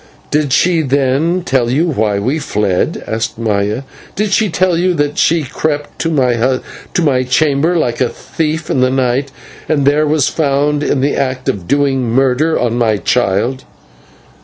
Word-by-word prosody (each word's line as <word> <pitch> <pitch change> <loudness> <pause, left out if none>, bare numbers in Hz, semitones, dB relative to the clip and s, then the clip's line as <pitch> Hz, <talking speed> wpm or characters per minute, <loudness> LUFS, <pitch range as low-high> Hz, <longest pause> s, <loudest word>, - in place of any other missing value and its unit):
"Did 150 -2 +1
she, 170 +4 +3
then, 140 +5 +1
tell 130 -3 +1
you 145 +7 +1
why 110 -10 0
we 130 +10 -1
fled?" 105 -9 -1
asked 110 0 -3
Maya. 105 +1 -1 0.3
"Did 210 +1 -1
she 215 0 +2
tell 180 +1 +1
you 180 +1 +1
that 145 -1 -1
she 165 -1 +2
crept 145 +1 -3
to 165 - 0 0.9
my 135 -5 +2
chamber 140 +6 +1
like 120 -7 -1
a 125 - +2
thief 160 0 -3
in - - +1
the 130 - +3
night, 130 +1 0 0.4
and 145 -3 +1
there 150 +2 +3
was 150 -2 +2
found 145 -1 0
in 145 -2 0
the 140 +2 +1
act 130 -2 -2
of 90 -4 -2
doing 135 -4 +1
murder 135 +6 +2
on 120 0 0
my 110 -3 +2
child?" 120 +5 0
140 Hz, 160 wpm, -15 LUFS, 125-155 Hz, 0.9 s, she